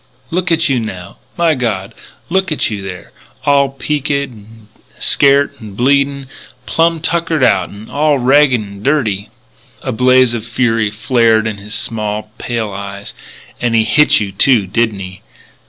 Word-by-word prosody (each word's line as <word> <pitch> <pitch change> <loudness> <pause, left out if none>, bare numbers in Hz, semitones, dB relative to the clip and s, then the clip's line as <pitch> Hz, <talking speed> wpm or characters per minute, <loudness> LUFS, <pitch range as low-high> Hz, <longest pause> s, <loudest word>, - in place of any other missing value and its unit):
"Look 180 +1 -1
at 165 -1 +2
you 135 -3 +1
now 95 -4 -7 0.2
my 170 -2 +3
God, 110 -8 -2 0.3
look 190 +1 0
at 150 - 0
you 105 -2 -4
there, 95 -2 -8 0.3
all 140 -1 +3
peaked 135 +2 -3
an' 115 -6 -5 0.3
scairt 140 0 +3
an' 105 -4 -10
bleedin' 140 +2 +1 0.4
plum 165 0 +1
tuckered 165 -3 0
out, 100 -6 +3
'n' 100 +2 -11
all 150 0 +1
ragged 130 0 +4
'n' 100 -2 -9
dirty 110 -7 0 0.3
" - - -31
A - - -2
blaze 130 +1 +4
of 115 -2 -3
fury 115 -2 0
flared 110 0 +2
in 110 -2 -3
his 105 +2 -6
small 110 -1 -3
pale 115 -3 -3
eyes: 100 0 -7 0.2
" - - -22
And 120 -1 +1
he 110 - +4
hit 150 +7 +4
you, 100 -2 -3
too, 110 +2 +3
did 115 +4 +1
he? 95 -2 -9
120 Hz, 165 wpm, -15 LUFS, 105-140 Hz, 0.4 s, ragged